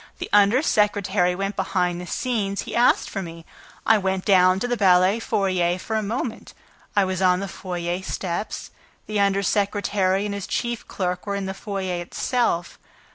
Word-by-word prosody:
The -, -, -6 dB
under 205 Hz, +7 st, +5 dB
secretary 200 Hz, -, +2 dB
went 195 Hz, +2 st, -3 dB
behind 180 Hz, -2 st, -1 dB
the 180 Hz, -, -8 dB
scenes. 205 Hz, -5 st, -1 dB
He -, -, -6 dB
asked 240 Hz, +1 st, +3 dB
for 195 Hz, -, -4 dB
me. 165 Hz, -2 st, -9 dB, 0.4 s
I 220 Hz, -1 st, +5 dB
went 190 Hz, -1 st, -1 dB
down 185 Hz, -1 st, +5 dB
to 245 Hz, -, 0 dB
the 245 Hz, -, 0 dB
ballet 190 Hz, 0 st, +4 dB
foyer 185 Hz, -5 st, 0 dB
for 220 Hz, +4 st, -4 dB
a 220 Hz, -, +1 dB
moment. 225 Hz, +2 st, -4 dB, 0.4 s
I 200 Hz, -2 st, +4 dB
was 185 Hz, 0 st, -2 dB
on 180 Hz, -1 st, +4 dB
the 200 Hz, -, -3 dB
foyer 180 Hz, -1 st, -4 dB
steps... 190 Hz, +1 st, -4 dB, 0.3 s
The 215 Hz, -1 st, -2 dB
under 200 Hz, 0 st, +2 dB
secretary 200 Hz, -1 st, +1 dB
and 205 Hz, -, -3 dB
his 200 Hz, -2 st, -5 dB
chief 235 Hz, -1 st, -3 dB
clerk 180 Hz, 0 st, -3 dB
were 200 Hz, -, -1 dB
in 200 Hz, -1 st, -3 dB
the 190 Hz, -, -3 dB
foyer 190 Hz, -3 st, -4 dB
itself. 175 Hz, -1 st, -1 dB
195 Hz, 180 wpm, -23 LUFS, 180-205 Hz, 0.4 s, under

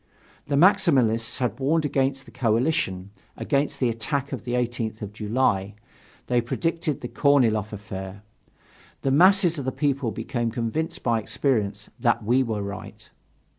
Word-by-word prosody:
The 145 Hz, -, 0 dB
Maximalists 140 Hz, -, +3 dB
had 125 Hz, -2 st, -2 dB
warned 155 Hz, +4 st, +1 dB
against 135 Hz, -1 st, 0 dB
the -, -, -14 dB
coalition, 110 Hz, -6 st, 0 dB, 0.3 s
against 140 Hz, +1 st, -1 dB
the 125 Hz, -, +2 dB
attack 130 Hz, +5 st, -2 dB
of 130 Hz, -, -6 dB
the 120 Hz, -, -3 dB
18th 120 Hz, -3 st, -2 dB
of 105 Hz, 0 st, -6 dB
July, 105 Hz, -2 st, 0 dB, 0.5 s
they 120 Hz, -1 st, +2 dB
predicted 165 Hz, +5 st, -2 dB
the 120 Hz, -, -4 dB
Korniloff 115 Hz, -7 st, +2 dB
affair 100 Hz, -1 st, -7 dB, 0.8 s
the 135 Hz, -, +1 dB
masses 175 Hz, +2 st, +5 dB
of 135 Hz, -, -5 dB
the 130 Hz, -, 0 dB
people 140 Hz, -3 st, 0 dB
became 115 Hz, +1 st, -2 dB
convinced 120 Hz, +7 st, -3 dB
by 115 Hz, -2 st, +2 dB
experience 105 Hz, -4 st, -1 dB
that 120 Hz, -3 st, +1 dB
we 120 Hz, +5 st, +3 dB
were 110 Hz, -5 st, -2 dB
right. 100 Hz, +2 st, -8 dB
120 Hz, 145 wpm, -25 LUFS, 110-140 Hz, 0.8 s, masses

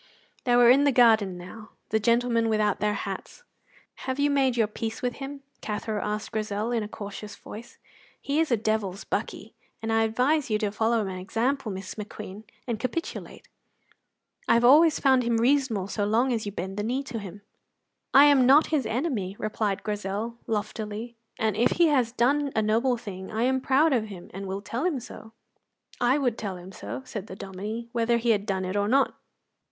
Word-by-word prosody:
They 245 Hz, -1 st, +3 dB
were 240 Hz, 0 st, +7 dB
in 275 Hz, +3 st, +5 dB
the 285 Hz, -, +4 dB
garden 220 Hz, -7 st, +4 dB
now, 210 Hz, +5 st, -11 dB, 0.2 s
the 220 Hz, -, +2 dB
gentlemen 235 Hz, 0 st, +2 dB
without 215 Hz, -2 st, +1 dB
their 210 Hz, 0 st, +1 dB
hats. -, -, -6 dB, 0.6 s
"Have 260 Hz, 0 st, -1 dB
you 285 Hz, 0 st, +2 dB
made 265 Hz, -3 st, +2 dB
your 225 Hz, -, +4 dB
peace 225 Hz, +2 st, -5 dB
with 245 Hz, -1 st, -1 dB
him?" 275 Hz, 0 st, -7 dB, 0.2 s
Cathro 210 Hz, 0 st, -3 dB
asked 210 Hz, +1 st, -3 dB
Grizel, 215 Hz, 0 st, -2 dB
in 235 Hz, -2 st, +1 dB
a 210 Hz, -, -4 dB
cautious 205 Hz, 0 st, -8 dB
voice. 235 Hz, +4 st, -11 dB, 0.4 s
"He 285 Hz, +2 st, -1 dB
is 325 Hz, -, +2 dB
a 235 Hz, -, +3 dB
devil's 210 Hz, -3 st, -1 dB
buckie, -, -, -4 dB, 0.3 s
and 225 Hz, 0 st, -2 dB
I 225 Hz, -, +3 dB
advise 250 Hz, +7 st, +1 dB
you 215 Hz, -, +2 dB
to 210 Hz, -2 st, -1 dB
follow 225 Hz, +1 st, +1 dB
my 185 Hz, -1 st, -5 dB
example, 230 Hz, +6 st, -1 dB
Miss 190 Hz, 0 st, -6 dB
McQueen, 210 Hz, 0 st, -8 dB, 0.2 s
and 235 Hz, -4 st, -3 dB
capitulate. 255 Hz, +8 st, -5 dB, 1.0 s
I -, -, +5 dB
have 235 Hz, +1 st, +3 dB
always 305 Hz, +5 st, +6 dB
found 265 Hz, -2 st, +4 dB
him 235 Hz, -1 st, +1 dB
reasonable 240 Hz, -5 st, +2 dB
so 205 Hz, 0 st, -2 dB
long 235 Hz, +5 st, +2 dB
as 220 Hz, -3 st, -2 dB
you -, -, -3 dB
bend 190 Hz, +1 st, -5 dB
the 205 Hz, -, -1 dB
knee 255 Hz, +5 st, -1 dB
to 245 Hz, -4 st, -5 dB
him." 200 Hz, 0 st, -9 dB, 0.7 s
"I 280 Hz, +2 st, +8 dB
am 275 Hz, -4 st, +5 dB
not 290 Hz, +5 st, +6 dB
his 280 Hz, -6 st, +1 dB
enemy," 220 Hz, -, -2 dB
replied 210 Hz, -2 st, -2 dB
Grizel, 210 Hz, +3 st, -3 dB
loftily, 215 Hz, +2 st, -4 dB, 0.2 s
"and 220 Hz, -2 st, 0 dB
if 230 Hz, +3 st, +3 dB
he 340 Hz, -2 st, +4 dB
has 255 Hz, -6 st, +2 dB
done 275 Hz, +4 st, +1 dB
a 220 Hz, -, +2 dB
noble 235 Hz, +4 st, +2 dB
thing 190 Hz, -5 st, -8 dB
I 220 Hz, +1 st, -1 dB
am 260 Hz, +1 st, +1 dB
proud 280 Hz, +4 st, +3 dB
of 230 Hz, -4 st, +1 dB
him 195 Hz, -5 st, -10 dB
and 195 Hz, +1 st, -6 dB
will 195 Hz, +1 st, -4 dB
tell 235 Hz, +6 st, -3 dB
him 340 Hz, -7 st, 0 dB
so." 220 Hz, -2 st, -11 dB, 0.7 s
"I 245 Hz, +3 st, +4 dB
would 250 Hz, -6 st, 0 dB
tell 195 Hz, -4 st, -4 dB
him 180 Hz, +2 st, -11 dB
so," 120 Hz, -, -7 dB
said 210 Hz, -1 st, -6 dB
the 190 Hz, -, -8 dB
Dominie, 205 Hz, +5 st, -6 dB
"whether 235 Hz, 0 st, +2 dB
he 235 Hz, 0 st, +2 dB
had 205 Hz, -1 st, 0 dB
done 190 Hz, -2 st, -1 dB
it 185 Hz, +2 st, -3 dB
or 205 Hz, 0 st, +1 dB
not." 270 Hz, +5 st, +3 dB
225 Hz, 200 wpm, -26 LUFS, 205-255 Hz, 1.0 s, I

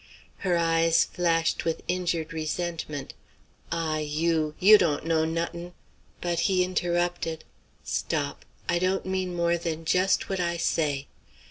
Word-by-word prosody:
Her 180 Hz, -4 st, +1 dB
eyes 165 Hz, 0 st, +3 dB
flashed 165 Hz, -2 st, 0 dB
with 165 Hz, -1 st, -2 dB
injured 175 Hz, -2 st, -1 dB
resentment. 160 Hz, -2 st, -3 dB, 0.6 s
"Ah, 160 Hz, -2 st, -1 dB
you! 155 Hz, 0 st, 0 dB
you 210 Hz, +3 st, +8 dB
dawn't 155 Hz, -4 st, +1 dB
know 160 Hz, -1 st, +2 dB
not'n' 170 Hz, +2 st, -3 dB, 0.2 s
" -, -, -34 dB
But 175 Hz, -1 st, -1 dB
he 185 Hz, -1 st, +3 dB
interrupted: 175 Hz, -2 st, -1 dB, 0.4 s
"Stop, -, -, -2 dB, 0.2 s
I 175 Hz, -, +2 dB
don't 185 Hz, +2 st, 0 dB
mean 185 Hz, -1 st, -2 dB
more 170 Hz, 0 st, +1 dB
than 165 Hz, -1 st, -4 dB
just 185 Hz, +3 st, +2 dB
what 195 Hz, -1 st, -2 dB
I 170 Hz, -1 st, 0 dB
say. 145 Hz, -4 st, 0 dB
170 Hz, 135 wpm, -27 LUFS, 160-175 Hz, 0.6 s, you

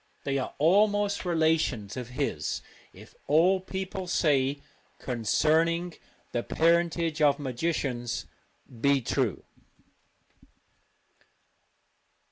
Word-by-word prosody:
They 140 Hz, -1 st, -1 dB
are 130 Hz, -, -5 dB
almost 205 Hz, +4 st, +2 dB
relations 160 Hz, -, +1 dB
of 125 Hz, -2 st, -6 dB
his, 125 Hz, -, -3 dB, 0.3 s
if -, -, -15 dB
all 175 Hz, +6 st, +4 dB
people 190 Hz, 0 st, -5 dB
say 140 Hz, -5 st, +1 dB, 0.4 s
concerning 160 Hz, +8 st, +1 dB, 0.4 s
the 120 Hz, -, -1 dB
parentage 165 Hz, +1 st, +1 dB
of 145 Hz, -2 st, +4 dB
magicians 130 Hz, -3 st, -2 dB, 0.4 s
be 135 Hz, +3 st, +1 dB
true. -, -, -1 dB
155 Hz, 85 wpm, -28 LUFS, 130-170 Hz, 0.4 s, all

